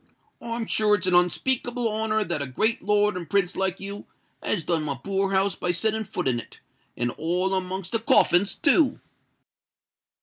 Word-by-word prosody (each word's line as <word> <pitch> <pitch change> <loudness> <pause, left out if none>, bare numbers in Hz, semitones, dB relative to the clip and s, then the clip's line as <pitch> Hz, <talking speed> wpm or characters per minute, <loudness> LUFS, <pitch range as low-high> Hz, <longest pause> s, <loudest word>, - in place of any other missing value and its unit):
I'm 230 0 -4
sure 215 -1 +2
it's 195 -2 -3
a 185 -1 +3
unspeakable 240 +7 +1
honour 220 0 0
that 170 -6 -3
a 140 - -2
great 220 - 0
lord 210 0 +2
and 175 -3 -6
prince 195 -2 +1
like 190 -1 -1
you 200 +1 -8 0.3
has 175 - -1
done 165 -1 0
my 145 -2 -3
poor 195 +7 -2
house 195 0 +1
by 180 - -4
setting 220 +5 0
foot - - -4
in 120 -2 +1
it—and 120 +2 -7
all 180 +4 0
amongst 185 -1 -3
the 225 - 0
coffins 200 -3 +4
too!" 320 -4 +3
195 Hz, 170 wpm, -25 LUFS, 175-220 Hz, 0.3 s, coffins